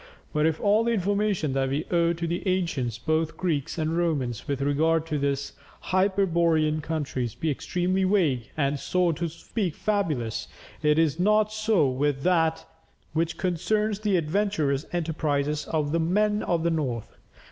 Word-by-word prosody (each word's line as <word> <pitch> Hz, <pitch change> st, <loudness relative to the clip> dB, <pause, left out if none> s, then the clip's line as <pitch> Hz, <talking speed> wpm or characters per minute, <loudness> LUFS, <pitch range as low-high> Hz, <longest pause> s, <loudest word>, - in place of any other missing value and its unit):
But 150 Hz, +1 st, +3 dB
if 160 Hz, -1 st, -1 dB
all 210 Hz, +2 st, +3 dB
the 235 Hz, 0 st, +1 dB
information 200 Hz, -6 st, 0 dB
that 135 Hz, 0 st, 0 dB
we 145 Hz, +4 st, -1 dB
owe 170 Hz, -1 st, +3 dB
to 170 Hz, 0 st, -3 dB
the 170 Hz, +1 st, -2 dB
ancients, 165 Hz, -, 0 dB
both 155 Hz, +5 st, -1 dB
Greeks 160 Hz, -6 st, -1 dB
and 160 Hz, 0 st, -1 dB
Romans, 140 Hz, -9 st, -1 dB
with 140 Hz, -2 st, -1 dB
regard 155 Hz, +3 st, +2 dB
to 155 Hz, -2 st, -2 dB
these 140 Hz, 0 st, -1 dB, 0.3 s
hyperborean 170 Hz, -5 st, +2 dB
countries 140 Hz, -7 st, -3 dB
be 160 Hz, -, -1 dB
extremely 180 Hz, +6 st, -1 dB
vague 165 Hz, -, +1 dB
and 140 Hz, -1 st, 0 dB
so 180 Hz, +2 st, +1 dB
to 170 Hz, +2 st, -2 dB
speak 180 Hz, +1 st, -3 dB
fabulous, 155 Hz, -, -1 dB, 0.3 s
it 150 Hz, 0 st, +3 dB
is 160 Hz, -1 st, +2 dB
not 215 Hz, +3 st, +3 dB
so 215 Hz, -8 st, +2 dB
with 135 Hz, +1 st, 0 dB
that 165 Hz, -3 st, +2 dB, 0.5 s
which 165 Hz, +1 st, -1 dB
concerns 200 Hz, +4 st, 0 dB
the 210 Hz, -3 st, +1 dB
adventurous 160 Hz, -4 st, 0 dB
enterprises 150 Hz, -3 st, -1 dB
of 150 Hz, -2 st, -1 dB
the 165 Hz, -, +1 dB
"Men 210 Hz, +5 st, +1 dB
of 170 Hz, -2 st, 0 dB
the 170 Hz, -, +2 dB
North." 130 Hz, -9 st, -3 dB
165 Hz, 160 wpm, -26 LUFS, 145-185 Hz, 0.5 s, But